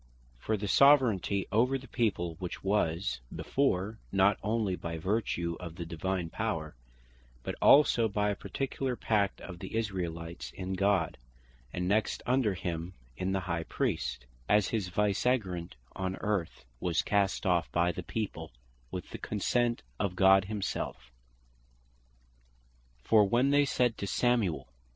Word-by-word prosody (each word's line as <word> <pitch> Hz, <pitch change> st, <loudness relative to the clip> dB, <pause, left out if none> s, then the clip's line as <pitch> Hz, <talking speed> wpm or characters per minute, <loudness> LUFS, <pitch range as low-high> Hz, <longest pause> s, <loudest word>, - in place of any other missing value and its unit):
For 110 Hz, -, -1 dB
the 105 Hz, -, -4 dB
Soveraignty 115 Hz, -8 st, +4 dB
over 125 Hz, +6 st, +3 dB
the 135 Hz, 0 st, -12 dB
people, 95 Hz, -8 st, 0 dB
which 90 Hz, -2 st, -6 dB
was 90 Hz, -8 st, 0 dB
before, 110 Hz, -5 st, 0 dB
not 95 Hz, +1 st, +3 dB
onely 105 Hz, -3 st, 0 dB
by 85 Hz, -2 st, -5 dB
vertue 85 Hz, -2 st, -1 dB
of 85 Hz, -3 st, -7 dB
the 85 Hz, -1 st, -5 dB
Divine 85 Hz, +2 st, -2 dB
Power, 80 Hz, -, -3 dB, 0.7 s
but -, -, -3 dB
also 130 Hz, -5 st, +6 dB
by 105 Hz, 0 st, 0 dB
a -, -, -2 dB
particular 135 Hz, +2 st, -3 dB
pact 105 Hz, -4 st, 0 dB
of 90 Hz, -2 st, -8 dB
the 95 Hz, +5 st, -7 dB
Israelites 85 Hz, -6 st, -3 dB
in 95 Hz, 0 st, -4 dB
God, 95 Hz, -6 st, +1 dB, 0.5 s
and 90 Hz, 0 st, -2 dB
next 105 Hz, +2 st, +1 dB
under 120 Hz, -6 st, +2 dB
him, 85 Hz, 0 st, -4 dB, 0.2 s
in 95 Hz, +8 st, -2 dB
the 95 Hz, 0 st, 0 dB
High 85 Hz, -2 st, -2 dB
Priest, 60 Hz, -5 st, -2 dB, 0.2 s
as 105 Hz, -2 st, +4 dB
his 105 Hz, -5 st, -1 dB
Viceregent 100 Hz, -2 st, 0 dB, 0.2 s
on 95 Hz, 0 st, -2 dB
earth, 95 Hz, -12 st, -2 dB
was 85 Hz, +2 st, 0 dB
cast 100 Hz, -1 st, +1 dB
off 90 Hz, -3 st, +1 dB
by 85 Hz, +1 st, +2 dB
the -, -, -5 dB
People, 110 Hz, -, -4 dB, 0.4 s
with -, -, -6 dB
the -, -, -6 dB
consent 120 Hz, +3 st, 0 dB, 0.2 s
of 90 Hz, -2 st, -1 dB
God 95 Hz, 0 st, +6 dB
himselfe. 100 Hz, -, -4 dB, 1.9 s
For 110 Hz, -2 st, +5 dB
when 120 Hz, +7 st, +2 dB
they 145 Hz, 0 st, +5 dB
said 125 Hz, -4 st, +1 dB
to 100 Hz, -, -3 dB
Samuel 115 Hz, -7 st, +1 dB
(1 -, -, -30 dB
Sam. -, -, -34 dB
95 Hz, 145 wpm, -30 LUFS, 90-110 Hz, 1.9 s, also